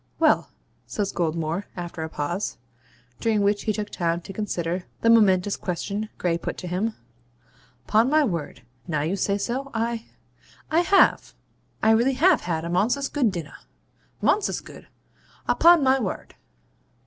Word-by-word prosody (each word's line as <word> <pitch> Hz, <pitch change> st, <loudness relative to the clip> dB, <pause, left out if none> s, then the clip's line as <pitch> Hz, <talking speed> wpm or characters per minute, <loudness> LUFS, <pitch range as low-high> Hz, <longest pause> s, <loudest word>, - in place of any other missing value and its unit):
'Well,' -, -, +3 dB, 0.4 s
says 205 Hz, -2 st, -2 dB
Goldmore, 165 Hz, +2 st, -1 dB
after 175 Hz, -2 st, -6 dB
a 160 Hz, -, -4 dB
pause, 170 Hz, +7 st, -3 dB, 0.6 s
during 220 Hz, -2 st, +1 dB
which 205 Hz, +1 st, +1 dB
he 215 Hz, -, +2 dB
took 210 Hz, 0 st, -4 dB
time 170 Hz, -1 st, -1 dB
to 195 Hz, -, -9 dB
consider 180 Hz, -3 st, -3 dB, 0.2 s
the 230 Hz, -, +5 dB
momentous 200 Hz, -3 st, +4 dB
question 200 Hz, +4 st, -4 dB
Gray 170 Hz, -2 st, 0 dB
put -, -, -5 dB
to 180 Hz, -, -6 dB
him 195 Hz, +6 st, -1 dB, 0.4 s
' 115 Hz, -, -33 dB
'Pon 220 Hz, +4 st, +3 dB
my 305 Hz, +1 st, +4 dB
word 165 Hz, -, -3 dB, 0.2 s
now 150 Hz, -3 st, -1 dB
you 165 Hz, +6 st, -1 dB
say 200 Hz, +1 st, 0 dB
so 250 Hz, +6 st, -3 dB
I 230 Hz, 0 st, -2 dB, 0.6 s
I 320 Hz, -, +4 dB
have 385 Hz, +3 st, +3 dB, 0.5 s
I 220 Hz, -, +5 dB
really 235 Hz, +4 st, +3 dB
have 345 Hz, +5 st, +4 dB
had 165 Hz, -2 st, -2 dB
a -, -, -3 dB
monsous 225 Hz, +11 st, +1 dB
good 255 Hz, -8 st, +1 dB
dinnah 170 Hz, -6 st, -7 dB, 0.7 s
monsous 420 Hz, -, +2 dB
good, -, -, -13 dB, 0.6 s
upon 340 Hz, -2 st, +6 dB
my 265 Hz, 0 st, +4 dB
ward! 205 Hz, -7 st, -4 dB
205 Hz, 155 wpm, -24 LUFS, 175-235 Hz, 0.7 s, upon